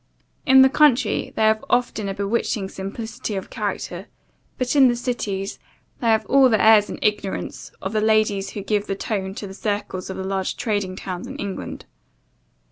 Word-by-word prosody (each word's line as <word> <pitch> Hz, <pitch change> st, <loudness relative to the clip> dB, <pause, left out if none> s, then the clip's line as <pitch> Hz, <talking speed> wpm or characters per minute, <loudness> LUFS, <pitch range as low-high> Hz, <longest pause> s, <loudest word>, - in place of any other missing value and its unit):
In 265 Hz, 0 st, +8 dB
the -, -, +7 dB
country, 265 Hz, -5 st, +3 dB
they -, -, +1 dB
have 220 Hz, 0 st, +3 dB
often 240 Hz, -4 st, 0 dB
a 195 Hz, -, -4 dB
bewitching 200 Hz, -1 st, -1 dB
simplicity 210 Hz, +2 st, -5 dB
of 190 Hz, -, -5 dB
character; 200 Hz, -2 st, -4 dB, 0.5 s
but, 255 Hz, +2 st, -1 dB
in 275 Hz, -2 st, +7 dB
the 240 Hz, -, +2 dB
cities, 210 Hz, -6 st, -3 dB, 0.4 s
they 235 Hz, -, -1 dB
have 220 Hz, -1 st, +3 dB
all 270 Hz, -1 st, +5 dB
the 220 Hz, -3 st, +3 dB
airs 215 Hz, -1 st, +6 dB
and -, -, -5 dB
ignorance 210 Hz, -2 st, -2 dB
of 190 Hz, +3 st, -3 dB
the 215 Hz, -, +1 dB
ladies 215 Hz, -2 st, +2 dB
who -, -, -3 dB
give 210 Hz, 0 st, 0 dB
the 195 Hz, -, -2 dB
tone 195 Hz, -2 st, -3 dB
to 210 Hz, -, -6 dB
the 190 Hz, -, -8 dB
circles 205 Hz, -2 st, -3 dB
of 190 Hz, -, -5 dB
the 190 Hz, -, -4 dB
large 190 Hz, 0 st, -2 dB
trading 205 Hz, -4 st, -1 dB
towns 185 Hz, +3 st, -6 dB
in 265 Hz, -, -7 dB
England. 200 Hz, -9 st, -6 dB
210 Hz, 185 wpm, -22 LUFS, 195-235 Hz, 0.5 s, In